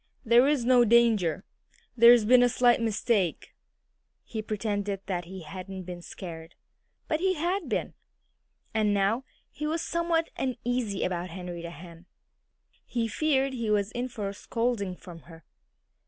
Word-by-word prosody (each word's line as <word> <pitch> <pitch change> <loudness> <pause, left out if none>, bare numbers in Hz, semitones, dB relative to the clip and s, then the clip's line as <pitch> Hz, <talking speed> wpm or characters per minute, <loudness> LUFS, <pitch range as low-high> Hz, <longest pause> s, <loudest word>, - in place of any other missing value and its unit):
"There's 245 +3 +4
no 250 -1 +6
danger. 220 -7 +3 0.5
There's 235 -1 +7
been 250 +3 +6
a 245 - +5
slight 245 0 +3
mistake." 215 -5 0 0.7
He 220 - -5
pretended 205 -2 -3
that 180 -3 -3
he 185 0 -9
hadn't 185 +3 -7
been 175 -1 -8
scared. 165 -2 -9 0.5
But 310 - 0
he 375 +1 +1
had 350 +4 -2
been. - - -2 0.8
And 210 -2 +2
now 205 +6 +1 0.3
he 300 +1 -4
was 325 +2 -1
somewhat 335 -1 0
uneasy 245 -5 -2
about 180 0 -2
Henrietta 175 -1 -7
Hen. 170 +1 -12 0.8
He 235 -2 -2
feared 275 +1 +1
he 235 -4 -3
was 205 -1 +1
in 245 +2 -3
for 220 -5 -5
a 195 - -4
scolding 230 -3 -2
from 175 -2 -12
her. 165 -2 -14
220 Hz, 140 wpm, -28 LUFS, 185-250 Hz, 0.8 s, There's